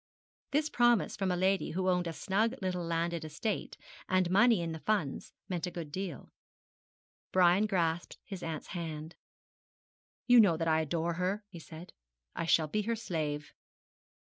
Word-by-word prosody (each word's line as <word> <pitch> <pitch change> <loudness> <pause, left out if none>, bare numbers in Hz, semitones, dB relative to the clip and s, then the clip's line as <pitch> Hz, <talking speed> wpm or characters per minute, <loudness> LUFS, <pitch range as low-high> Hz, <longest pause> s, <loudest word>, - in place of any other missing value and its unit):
This 300 +2 +1
promise 240 -5 +3
from 195 -2 -1
a 180 - +1
lady 190 0 +1
who 185 +2 -1
owned 180 -1 +2
a - - -2
snug 215 +8 0
little 185 -2 -2
landed 170 0 -1
estate, 165 +7 -3 0.3
and 185 -1 +2
money 220 -1 +5
in 165 - -3
the 160 - -5
funds, 180 -8 -1 0.2
meant 180 -2 -2
a - - -2
good 170 -4 -7
deal. 185 -5 -5 1.0
Brian 185 +3 +4
grasped 175 -4 -1
his 195 -4 -7
aunt's 160 -3 -5
hand. 160 -2 -5 1.1
'You 245 -1 +7
know 185 -7 +5
that 165 0 -1
I 160 0 +3
adore 165 +2 -1
her,' 185 +5 -1
he 175 -4 -10
said. 160 +2 -11 0.4
'I - - -2
shall 160 -1 +4
be 210 +8 0
her 230 +2 -1
slave.' 150 -8 -3
180 Hz, 165 wpm, -32 LUFS, 165-195 Hz, 1.1 s, You